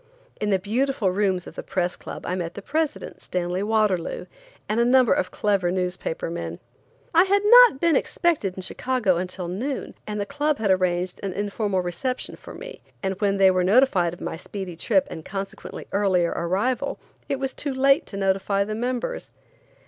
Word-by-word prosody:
In 210 Hz, -, -1 dB
the 195 Hz, -, +4 dB
beautiful 220 Hz, +1 st, 0 dB
rooms 190 Hz, -2 st, 0 dB
of -, -, -10 dB
the -, -, -6 dB
Press 180 Hz, -1 st, -1 dB
Club -, -, -8 dB
I -, -, -2 dB
met 170 Hz, -2 st, -4 dB
the 200 Hz, -, -7 dB
president, 310 Hz, +3 st, -2 dB
Stanley 180 Hz, +1 st, -2 dB
Waterloo, 210 Hz, -5 st, 0 dB, 0.4 s
and 215 Hz, +2 st, 0 dB
a -, -, +5 dB
number 250 Hz, 0 st, +5 dB
of 185 Hz, -, 0 dB
clever 200 Hz, -4 st, +1 dB
newspaper 180 Hz, -2 st, -2 dB
men. 85 Hz, -, -4 dB, 0.6 s
I 340 Hz, +3 st, +6 dB
had 400 Hz, +1 st, +2 dB
not 480 Hz, -, +8 dB
been 335 Hz, 0 st, +3 dB
expected 300 Hz, -, 0 dB
in 185 Hz, -, -6 dB
Chicago 230 Hz, -3 st, 0 dB
until 180 Hz, 0 st, -4 dB
noon, 245 Hz, +11 st, -3 dB
and 210 Hz, 0 st, -3 dB
the 200 Hz, -, -1 dB
club 295 Hz, +4 st, 0 dB
had 210 Hz, -3 st, +1 dB
arranged 180 Hz, -1 st, 0 dB
an 195 Hz, -2 st, -3 dB
informal 205 Hz, -1 st, -1 dB
reception 250 Hz, +9 st, -3 dB
for -, -, -11 dB
me, -, -, -9 dB, 0.2 s
and 190 Hz, +1 st, -2 dB
when 200 Hz, -1 st, +2 dB
they 190 Hz, -1 st, +6 dB
were 185 Hz, -1 st, +1 dB
notified 190 Hz, -5 st, +3 dB
of -, -, -18 dB
my 160 Hz, -, -4 dB
speedy 185 Hz, 0 st, -7 dB
trip 280 Hz, -, +1 dB
and 160 Hz, -, -7 dB
consequently 195 Hz, +2 st, -6 dB
earlier 185 Hz, -4 st, +2 dB
arrival, 215 Hz, +11 st, -1 dB, 0.3 s
it 275 Hz, -, 0 dB
was 270 Hz, 0 st, -2 dB
too 285 Hz, -, -2 dB
late 275 Hz, +4 st, +3 dB
to 200 Hz, -, -7 dB
notify 195 Hz, +1 st, +1 dB
the 215 Hz, +2 st, -4 dB
members. 250 Hz, -, -3 dB
200 Hz, 185 wpm, -24 LUFS, 185-260 Hz, 0.6 s, not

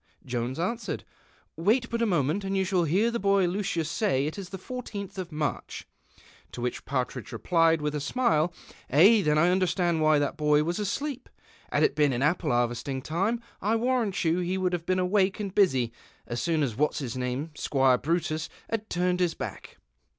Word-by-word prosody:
"' -, -, -32 dB
Jonts 125 Hz, 0 st, -3 dB
answered, 225 Hz, +8 st, -3 dB, 0.3 s
"' -, -, -35 dB
Wait 225 Hz, +9 st, +2 dB
bnt 235 Hz, 0 st, -2 dB
a 230 Hz, -, +3 dB
moment 170 Hz, +1 st, +1 dB
and 195 Hz, 0 st, -1 dB
you 190 Hz, -, +1 dB
siiall 180 Hz, -4 st, +1 dB
liear 215 Hz, +7 st, +3 dB
the 235 Hz, -, -2 dB
boy 195 Hz, -1 st, +3 dB
Lueius 180 Hz, -2 st, -1 dB
say 165 Hz, -4 st, 0 dB
it 155 Hz, -, -3 dB
is 195 Hz, -3 st, -7 dB
the 190 Hz, -, -6 dB
l 250 Hz, 0 st, -4 dB
tth 200 Hz, -4 st, -7 dB
of 180 Hz, -2 st, -4 dB
Mareh." 150 Hz, -1 st, -3 dB, 0.7 s
To 120 Hz, -, -6 dB
whieh 125 Hz, 0 st, -3 dB
Partridge 130 Hz, -2 st, -3 dB
rephed 165 Hz, -2 st, +2 dB
witli 150 Hz, 0 st, -1 dB
a 150 Hz, -, -1 dB
smile, 170 Hz, -, +1 dB, 0.2 s
" -, -, -25 dB
Ay, 195 Hz, -, +7 dB
then 150 Hz, -1 st, +2 dB
I 170 Hz, +3 st, +4 dB
understand 175 Hz, -2 st, +1 dB
why 155 Hz, -1 st, +5 dB
the 145 Hz, -1 st, +1 dB
boy 150 Hz, -2 st, +2 dB
was 170 Hz, +5 st, -2 dB
asleej). 265 Hz, +6 st, -3 dB, 0.4 s
Had -, -, +2 dB
it -, -, +3 dB
been 145 Hz, -3 st, +2 dB
in 120 Hz, +2 st, -1 dB
apple 155 Hz, +1 st, +1 dB
iiarvesting 120 Hz, +2 st, -1 dB
time 195 Hz, +11 st, -1 dB, 0.2 s
I 215 Hz, +4 st, +1 dB
warrant 230 Hz, -5 st, 0 dB
you 165 Hz, +2 st, +2 dB
he 180 Hz, +1 st, -1 dB
would 185 Hz, -1 st, 0 dB
have 170 Hz, -1 st, -3 dB
been 185 Hz, -, +2 dB
awake 190 Hz, +1 st, +2 dB
and 200 Hz, -3 st, -4 dB
busy 130 Hz, -, +2 dB, 0.3 s
as 120 Hz, 0 st, -3 dB
soon 160 Hz, -3 st, +1 dB
as 120 Hz, -6 st, -2 dB
what"s 150 Hz, +5 st, +1 dB
jus 130 Hz, -5 st, -4 dB
nanu', 130 Hz, +5 st, -3 dB
Squire 135 Hz, -3 st, +2 dB
Brutus, 160 Hz, -1 st, -1 dB, 0.2 s
had 220 Hz, -1 st, -2 dB
turned 180 Hz, 0 st, 0 dB
his 175 Hz, -2 st, +1 dB
baek."' -, -, -7 dB
175 Hz, 205 wpm, -27 LUFS, 150-195 Hz, 0.7 s, Ay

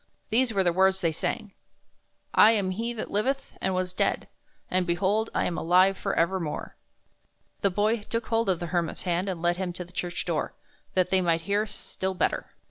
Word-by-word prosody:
These 245 Hz, +2 st, +3 dB
were 195 Hz, -3 st, +2 dB
the 175 Hz, -2 st, +2 dB
words 190 Hz, +1 st, +3 dB
they 165 Hz, -3 st, +2 dB
sang: 200 Hz, +5 st, -2 dB, 0.8 s
"7 225 Hz, +1 st, +7 dB
am 195 Hz, -3 st, 0 dB
He 230 Hz, +5 st, -2 dB
that 230 Hz, -2 st, -5 dB
liveth, 265 Hz, +7 st, -1 dB
and 190 Hz, 0 st, 0 dB
was 185 Hz, 0 st, -1 dB
dead; -, -, 0 dB, 0.4 s
and, 185 Hz, 0 st, 0 dB
behold, 195 Hz, +6 st, +1 dB
I -, -, +2 dB
am 170 Hz, -, -2 dB
alive 185 Hz, +3 st, +4 dB
for -, -, -2 dB
evermore! 170 Hz, -2 st, -1 dB, 0.4 s
" -, -, -43 dB
The 200 Hz, -, +3 dB
Boy 210 Hz, +4 st, +1 dB
took 230 Hz, +2 st, -3 dB
hold 225 Hz, -2 st, +1 dB
of 180 Hz, -3 st, +1 dB
the 175 Hz, -, -3 dB
Hermit's 170 Hz, -2 st, -1 dB
hand 180 Hz, +2 st, 0 dB
and 175 Hz, -3 st, -4 dB
led 175 Hz, 0 st, +2 dB
him 185 Hz, -2 st, -3 dB
to 180 Hz, 0 st, -5 dB
the 180 Hz, -, -19 dB
church 175 Hz, +1 st, -3 dB
door, 170 Hz, -4 st, -2 dB, 0.4 s
that 185 Hz, -1 st, +2 dB
they 190 Hz, -1 st, +4 dB
might 165 Hz, -2 st, +2 dB
hear 205 Hz, +5 st, 0 dB
still 190 Hz, -2 st, -4 dB
better. -, -, 0 dB
190 Hz, 205 wpm, -27 LUFS, 175-210 Hz, 0.8 s, 7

